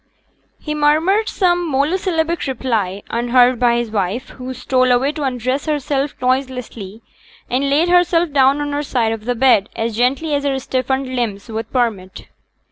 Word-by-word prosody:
He 300 - -4
murmured 315 +9 +2
some 350 -3 +1
monosyllabic 325 +3 0
reply, 220 -7 -2
unheard 245 +1 +3
by 240 -1 +3
his 235 -2 -2
wife, 210 +5 -2
who 255 0 -8
stole 255 0 +1
away 255 +3 +2
to 305 - -7
undress 260 +1 -2
herself 285 -1 -1
noiselessly, 250 -5 -3 0.5
and 270 +3 +1
laid 300 +5 +3
herself 350 -2 +3
down 275 +1 +3
on 290 0 -3
her 290 0 -1
side 240 -6 0
of 220 -1 -5
the 245 0 -1
bed 235 -4 +3
as 225 -1 -2
gently 275 +6 +1
as 285 -1 0
her 275 -1 0
stiffened 265 0 -2
limbs 225 -3 -3
would 225 0 -5
permit. 215 -7 -2
260 Hz, 160 wpm, -18 LUFS, 235-295 Hz, 0.5 s, unheard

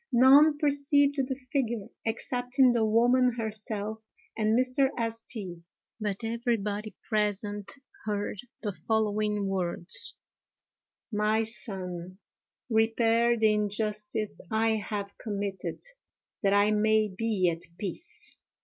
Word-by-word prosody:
None 275 +5 +7
perceived 285 0 +2
the 265 -1 0 0.2
figure 235 -7 -1 0.2
excepting 250 +3 +2
the 235 -2 +2
woman 245 +3 +4
herself 215 -1 -4 0.4
and 220 0 +2
Mr. 255 +2 +2 0.4
St. 185 -7 -4 0.2
——; - - -64
but 205 +1 -2
everybody 225 -3 -2
present 205 -1 -1 0.3
heard 205 -1 -2 0.2
the 210 - -1
following 210 0 0
words: 185 -2 +1 1.0
"My 215 +1 +2
son, 185 -5 -4 0.5
repair 230 +1 +3
the 220 -1 +4
injustice 210 0 -1
I 220 0 +2
have 200 -1 -4
committed, 200 -3 -4 0.6
that 200 -3 +3
I 205 +1 +4
may 215 0 +3
be 195 -2 0
at 165 0 -6 0.2
peace!" 210 - -5
215 Hz, 105 wpm, -28 LUFS, 205-235 Hz, 1.0 s, None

